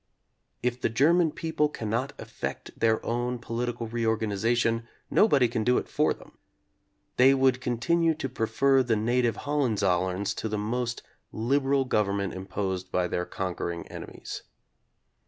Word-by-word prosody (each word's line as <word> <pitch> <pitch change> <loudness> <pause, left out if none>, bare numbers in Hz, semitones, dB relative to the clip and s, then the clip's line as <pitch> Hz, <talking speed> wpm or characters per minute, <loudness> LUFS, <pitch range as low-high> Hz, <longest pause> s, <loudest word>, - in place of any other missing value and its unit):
If 125 0 -1
the - - +2
German 160 +8 +4
people 160 -1 0
cannot 115 +1 -2
effect - - -6
their 110 -1 +1
own 120 +1 -1
political 120 0 -3
reorganization, 115 0 0 0.2
nobody 145 - +5
can 115 -1 -2
do 125 +2 +3
it - - -2
for - - +2
them. - - -9 0.8
They 135 +2 +7
would 130 -1 +3
continue 160 +7 +1
to 140 - -3
prefer 130 +3 +2
the 120 -3 +1
native 120 +2 +1
Hohenzollerns 100 -8 +1
to 110 - -2
the 105 - -1
most 120 +3 -2 0.3
liberal 135 +4 +1
government 100 -5 0
imposed 95 -1 -4
by 90 -1 +1
their 90 0 -2
conquering 85 -2 -4
enemies. - - -7
120 Hz, 135 wpm, -27 LUFS, 105-130 Hz, 0.8 s, They